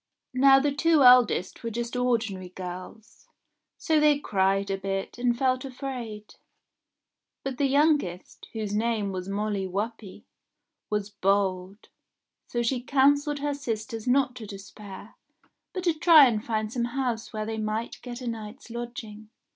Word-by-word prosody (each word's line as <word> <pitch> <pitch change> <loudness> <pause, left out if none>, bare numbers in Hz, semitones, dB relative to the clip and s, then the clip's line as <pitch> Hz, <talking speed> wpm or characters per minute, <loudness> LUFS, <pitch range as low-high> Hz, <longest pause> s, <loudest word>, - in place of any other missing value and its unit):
Now 270 +1 +6
the 285 +1 +1
two 310 +1 +3
eldest 250 -7 +5
were 230 - -3
just 235 +2 -4
ordinary 225 -7 -1
girls, 185 +4 -9 0.5
so 315 -2 +2
they 300 -1 +5
cried 195 -5 0
a 195 - -1
bit 195 +3 -4
and 240 -1 +1
felt 255 0 +1
afraid; 250 -6 -7 1.1
but 265 -2 -4
the 280 - +3
youngest, 280 - 0
whose 215 -2 -3
name 215 -2 0
was 185 0 -5
Molly 200 -1 -2
Whuppie, 210 +1 -5 0.7
was 210 -1 -2
bold, 195 0 -1 0.6
so 240 -1 -1
she 245 +1 0
counselled 285 +2 +2
her 290 0 -1
sisters 225 -4 -5
not 255 0 +3
to 220 -3 -8
despair, 200 +1 -10 0.6
but 370 - -5
to 345 -2 +2
try 310 -1 +7
and 220 -4 0
find 220 -1 -2
some 240 -2 0
house 245 -4 -2
where 215 -1 -3
they 220 0 -4
might 215 +2 -3
get 245 0 -7
a 250 - -5
night's 225 +1 -7
lodging. 230 -3 -7
230 Hz, 145 wpm, -27 LUFS, 205-260 Hz, 1.1 s, try